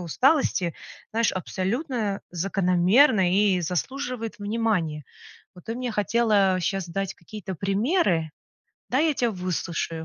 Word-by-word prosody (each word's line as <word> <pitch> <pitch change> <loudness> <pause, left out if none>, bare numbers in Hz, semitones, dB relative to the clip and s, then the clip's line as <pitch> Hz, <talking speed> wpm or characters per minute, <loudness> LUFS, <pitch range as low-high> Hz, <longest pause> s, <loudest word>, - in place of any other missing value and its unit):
усталости, 185 - +2 0.4
знаешь, 230 0 +2
абсолютно 205 - -2
закономерно 185 - +3
и 195 -1 +3
заслуживает 230 - -3
внимания. 205 -8 -1 0.5
Вот 180 - -15
ты 225 - -3
мне 250 -2 -3
хотела 210 -3 +2
щас 190 0 -2
дать 195 +2 -3
какие-то 190 +2 -8
примеры, 195 - +1 0.6
дай 290 +6 +3
я 305 - +1
тя 240 -3 +1
выслушаю. 170 -3 -3
195 Hz, 115 wpm, -25 LUFS, 180-230 Hz, 0.6 s, закономерно